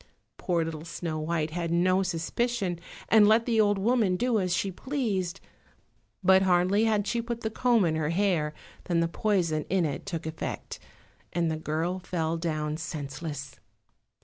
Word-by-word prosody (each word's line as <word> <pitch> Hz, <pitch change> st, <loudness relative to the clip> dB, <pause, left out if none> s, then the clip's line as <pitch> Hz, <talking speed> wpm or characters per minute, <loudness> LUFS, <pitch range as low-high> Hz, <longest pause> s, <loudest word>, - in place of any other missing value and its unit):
Poor 170 Hz, -3 st, 0 dB
little 160 Hz, -1 st, -5 dB
Snow 165 Hz, -1 st, -4 dB
white 155 Hz, 0 st, -1 dB
had 170 Hz, 0 st, -2 dB
no 185 Hz, +3 st, +3 dB
suspicion, 185 Hz, +2 st, -1 dB, 0.3 s
and 215 Hz, -2 st, +6 dB
let 220 Hz, +2 st, +4 dB
the 225 Hz, -3 st, +3 dB
old 205 Hz, -1 st, +3 dB
woman 215 Hz, -2 st, +2 dB
do 240 Hz, +3 st, +1 dB
as 185 Hz, -2 st, -1 dB
she 195 Hz, +2 st, 0 dB
pleased, 200 Hz, -6 st, -2 dB, 0.8 s
but 190 Hz, +1 st, +6 dB
hardly 185 Hz, +3 st, +3 dB
had 210 Hz, -2 st, +2 dB
she 235 Hz, +3 st, 0 dB
put 235 Hz, 0 st, -4 dB
the 220 Hz, -, -2 dB
comb 235 Hz, -3 st, +3 dB
in 160 Hz, -1 st, +1 dB
her 155 Hz, -1 st, 0 dB
hair 170 Hz, -4 st, +1 dB, 0.3 s
than 170 Hz, -2 st, +1 dB
the 170 Hz, -, +2 dB
poison 165 Hz, -4 st, 0 dB
in 185 Hz, -2 st, +2 dB
it 150 Hz, +5 st, -4 dB
took 165 Hz, -4 st, -4 dB
effect, 160 Hz, 0 st, -5 dB, 0.5 s
and 170 Hz, -1 st, +1 dB
the -, -, -1 dB
girl 160 Hz, +4 st, -2 dB
fell 165 Hz, -3 st, -2 dB
down 155 Hz, -2 st, -2 dB
senseless. 145 Hz, -3 st, -6 dB
175 Hz, 165 wpm, -28 LUFS, 160-205 Hz, 0.8 s, and